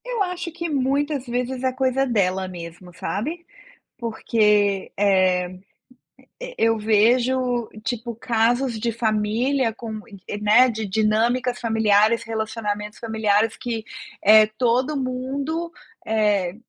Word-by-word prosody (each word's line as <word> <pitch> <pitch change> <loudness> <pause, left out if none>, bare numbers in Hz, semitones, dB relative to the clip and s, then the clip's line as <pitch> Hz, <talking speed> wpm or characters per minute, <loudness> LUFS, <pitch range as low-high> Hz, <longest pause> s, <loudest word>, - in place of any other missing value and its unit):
Eu 485 -4 -1
acho 360 -2 -4
que 340 +1 -4
muitas 280 0 0
vezes 250 +1 -3
é 260 - +2
coisa 260 +1 0
dela 190 -5 0
mesmo, 175 0 -9
sabe, 305 - -4 0.5
porque, 210 -4 +1
eh, 185 -2 +2 1.0
eu 225 0 +2
vejo 240 +3 +2 0.2
tipo 240 -2 -3
casos 235 +1 0
de 230 +2 -1
família 225 +3 0
com, 230 +1 -8 0.5
né, 220 +5 +5
de 220 -2 -3
dinâmicas 225 +5 +1
familiares, 220 0 +3
relacionamentos 215 -2 -4
familiares 220 -1 +1
que 235 -4 -4 0.4
eh 215 +1 +7
todo 255 +4 +1
mundo, 275 +6 -3 0.3
eh, 205 -5 +1
230 Hz, 110 wpm, -22 LUFS, 210-255 Hz, 1.0 s, eh